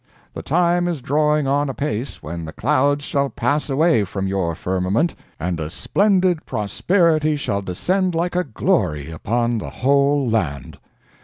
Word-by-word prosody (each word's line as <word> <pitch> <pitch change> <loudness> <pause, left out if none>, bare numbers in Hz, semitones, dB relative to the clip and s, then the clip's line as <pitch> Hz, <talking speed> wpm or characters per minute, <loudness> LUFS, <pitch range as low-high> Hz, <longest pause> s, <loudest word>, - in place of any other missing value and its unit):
The - - -6
time 175 +2 +2
is 170 -4 -2
drawing 150 +3 +1
on 140 +1 +1
apace 130 - -4
when 85 +2 -5
the 80 - -7
clouds 145 +2 +1
shall 140 -1 0
pass 150 +2 -1
away 145 -4 +3
from 95 0 -3
your 95 -4 -1
firmament, 95 - 0 0.3
and 85 0 -2
a 80 -1 -3
splendid 185 - +1
prosperity 155 - +1
shall 100 -8 -2
descend 180 - -1
like 175 +2 -1
a 180 - +2
glory 75 - -1
upon 115 +8 -1
the - - -6
whole 140 +1 +2
land! 75 - -2
140 Hz, 150 wpm, -21 LUFS, 95-155 Hz, 0.3 s, away